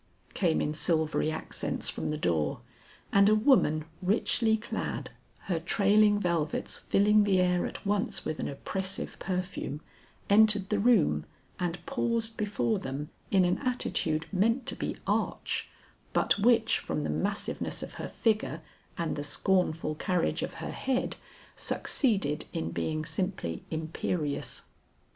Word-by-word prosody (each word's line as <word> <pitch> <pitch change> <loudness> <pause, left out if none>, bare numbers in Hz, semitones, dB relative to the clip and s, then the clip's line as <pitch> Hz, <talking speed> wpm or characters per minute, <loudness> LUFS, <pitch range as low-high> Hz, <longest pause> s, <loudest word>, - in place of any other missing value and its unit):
came 170 -5 +2
in 150 - -1
silvery 160 -1 +1
accents 155 - -3
from - - -2
the 150 - -1
door, 80 - 0 0.5
and 200 +1 +6
a 215 - +5
woman 215 - +4 0.2
richly 220 +3 +2
clad, 220 - -4 0.3
her 175 -4 -1
trailing 205 +4 +4
velvets 170 -5 -1
filling 210 +1 +4
the 195 -2 +3
air 180 -1 +2
at - - -9
once 205 +4 0
with 155 - -3
an - - -2
oppressive 190 +7 -3
perfume, 180 -6 -3 0.5
entered 210 -1 +5
the 210 - +1
room 200 - +4 0.4
and 175 -1 -3
paused 230 -1 -1
before 165 - 0
them 140 +3 -5 0.2
in 190 -2 +4
an 180 +1 +1
attitude 170 - -1
meant 230 +7 +2
to - - -1
be - - -3
arch, - - -1 0.4
but - - +2
which 230 +1 +4
from 150 - -3
the - - -1
massiveness 200 +1 -2
of - - -8
her - - -3
figure 215 -8 0 0.3
and 165 -2 -1
the 145 - -3
scornful 165 -1 +1
carriage 175 +2 0
of - - -4
her - - -5
head, 260 -1 -1 0.4
succeeded 195 - +1
in 80 +1 -2
being 155 - -2
simply 155 - -2
imperious. 160 -1 -2
185 Hz, 140 wpm, -29 LUFS, 155-210 Hz, 0.5 s, and